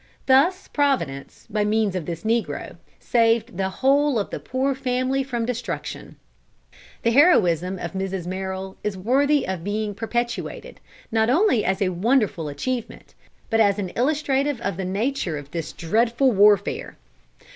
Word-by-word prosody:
Thus 305 +9 +3
Providence, 265 - -1
by 210 -2 0
means 210 -2 +1
of 175 -5 -4
this 170 -1 -5
negro, 230 +1 -2 0.2
saved 230 -1 +1
the 190 -1 0
whole 275 +5 +2
of 205 - -2
the - - -4
poor 265 +2 -1
family 260 0 -1
from 245 -4 -2
destruction." 250 0 -5 0.9
The 230 - +3
heroism 190 - +4
of 170 -2 -5
Mrs. 190 -1 -3
Merrill 190 +1 -5
is 205 -2 -2
worthy 275 +8 +2
of 185 -3 -4
being 210 +1 -2
perpetuated, 235 +3 -4 0.3
not 220 0 +2
only 290 - +3
as 190 +2 0
a 185 - +1
wonderful 200 - +1
achievement, 235 - -5 0.4
but 225 - +2
as 205 -2 +4
illustrative 275 - 0
of 200 - -2
the 190 +1 -4
nature 195 - -1
of 145 0 -10
this 165 -3 -4
dreadful 230 +9 +1
warfare. 205 - +3
225 Hz, 145 wpm, -23 LUFS, 190-260 Hz, 0.9 s, heroism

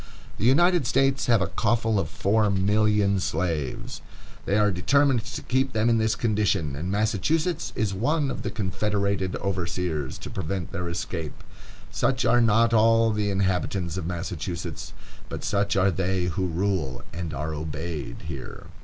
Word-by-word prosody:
The 105 - 0
United 170 +2 +4
States 135 +2 +2
have 115 -5 +4
a - - -1
coffle 115 -2 +1
of 80 -6 -2
four 105 +5 +1
millions 100 0 +2
of - - -1
slaves. 80 -7 -3 0.4
They 100 - +1
are 105 -1 +3
determined 130 +6 +2
to 120 - -6
keep 130 +1 0
them 110 +1 +2
in 115 - +3
this 110 0 +1
condition; 105 - 0
and 85 +6 -3
Massachusetts 120 - 0
is 105 -3 0
one 140 +8 0
of - - -5
the - - -3
confederated 100 -2 -1
overseers 90 -6 -2
to - - -8
prevent 90 +1 -3
their 90 -2 -3
escape. 85 -2 -5 0.5
Such - - +1
are 120 +1 +4
not 115 +1 +4
all 115 0 +5
the 105 -1 0
inhabitants 95 -2 -1
of 90 -3 -3
Massachusetts, 85 -1 -5 0.4
but - - -5
such 100 +1 0
are 95 0 +3
they 95 +1 0
who 90 +1 -1
rule 85 -6 -1
and 85 -1 -4
are 75 +2 -3
obeyed 75 -4 -5
here. 65 - -7
100 Hz, 160 wpm, -25 LUFS, 90-110 Hz, 0.5 s, all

